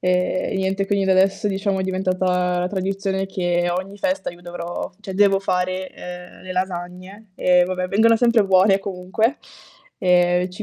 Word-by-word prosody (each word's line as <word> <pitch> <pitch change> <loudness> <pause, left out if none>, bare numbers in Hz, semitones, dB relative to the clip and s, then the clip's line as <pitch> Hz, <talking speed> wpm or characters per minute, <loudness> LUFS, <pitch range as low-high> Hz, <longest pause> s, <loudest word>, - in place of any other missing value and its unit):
Ehm, 180 +1 0
niente 190 +1 -1
quindi 200 -1 +1
da 190 - +3
adesso 190 +2 +2
diciamo 195 0 -1
è - - -1
diventata 185 -1 0
la 180 - 0
tradizione 195 0 -2
che 175 -2 0
ogni 190 +3 -4
festa 190 -1 -1
io 175 0 -15
dovrò 175 0 -6
cioè 195 -2 -7
devo 195 -1 +4
fare, 185 -1 -1
ehm, 180 0 -10
le 185 0 -6
lasagne 185 +3 -5
e 180 0 +4
vabbè 185 0 -2
vengono 225 +4 +4
sempre 235 -2 +3
buone 195 +1 +4
comunque. 195 +7 -1 0.6
Ehm 180 0 +3
185 Hz, 160 wpm, -21 LUFS, 180-195 Hz, 0.6 s, devo